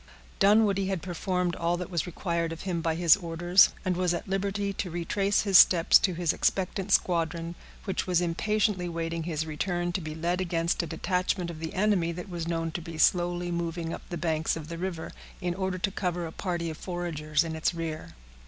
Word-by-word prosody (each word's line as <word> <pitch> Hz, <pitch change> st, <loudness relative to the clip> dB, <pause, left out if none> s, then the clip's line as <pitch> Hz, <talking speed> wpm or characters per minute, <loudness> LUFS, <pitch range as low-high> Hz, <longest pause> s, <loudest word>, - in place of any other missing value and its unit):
Dunwoodie 200 Hz, -1 st, +4 dB
had 190 Hz, -4 st, -2 dB
performed 180 Hz, 0 st, -1 dB
all 170 Hz, +1 st, 0 dB
that 180 Hz, +1 st, -6 dB
was 170 Hz, -2 st, -1 dB
required 170 Hz, -1 st, -2 dB
of 165 Hz, -, -6 dB
him 180 Hz, -3 st, -2 dB
by 165 Hz, -1 st, 0 dB
his 170 Hz, -1 st, +6 dB
orders, 175 Hz, 0 st, +4 dB, 0.2 s
and 185 Hz, -1 st, +1 dB
was 180 Hz, -1 st, +1 dB
at 190 Hz, -, -6 dB
liberty 200 Hz, +1 st, -1 dB
to 190 Hz, -, -3 dB
retrace 195 Hz, +4 st, 0 dB
his 195 Hz, -4 st, +7 dB
steps 170 Hz, -2 st, +7 dB
to 185 Hz, -, 0 dB
his 170 Hz, -2 st, +1 dB
expectant 190 Hz, +1 st, -1 dB
squadron, 170 Hz, -2 st, +1 dB, 0.3 s
which 190 Hz, -1 st, -2 dB
was 180 Hz, -2 st, +3 dB
impatiently 185 Hz, +2 st, 0 dB
waiting 165 Hz, -1 st, -3 dB
his 160 Hz, -2 st, -2 dB
return 175 Hz, +3 st, -2 dB
to 180 Hz, -, -2 dB
be 155 Hz, -1 st, -6 dB
led 175 Hz, +3 st, -1 dB
against 170 Hz, -1 st, 0 dB
a 170 Hz, -, -5 dB
detachment 180 Hz, +1 st, -1 dB
of 160 Hz, -, -9 dB
the 160 Hz, 0 st, -5 dB
enemy 190 Hz, -4 st, +2 dB
that 180 Hz, +3 st, -7 dB
was 170 Hz, -2 st, -4 dB
known 165 Hz, -1 st, -1 dB
to 175 Hz, -, -4 dB
be 165 Hz, -1 st, -8 dB
slowly 175 Hz, +1 st, +2 dB
moving 170 Hz, -1 st, -3 dB
up -, -, -6 dB
the 175 Hz, -, -4 dB
banks 160 Hz, -2 st, 0 dB
of 160 Hz, -1 st, -7 dB
the 170 Hz, -, -5 dB
river, 175 Hz, -3 st, -4 dB, 0.3 s
in 175 Hz, -2 st, -1 dB
order 190 Hz, 0 st, -2 dB
to 195 Hz, +2 st, -1 dB
cover 180 Hz, -2 st, -2 dB
a 160 Hz, -, -6 dB
party 170 Hz, -3 st, -3 dB
of 155 Hz, -, -8 dB
foragers 165 Hz, -4 st, -1 dB
in 160 Hz, -1 st, -4 dB
its 160 Hz, -, +1 dB
rear. 160 Hz, -, -5 dB
175 Hz, 205 wpm, -28 LUFS, 165-185 Hz, 0.3 s, his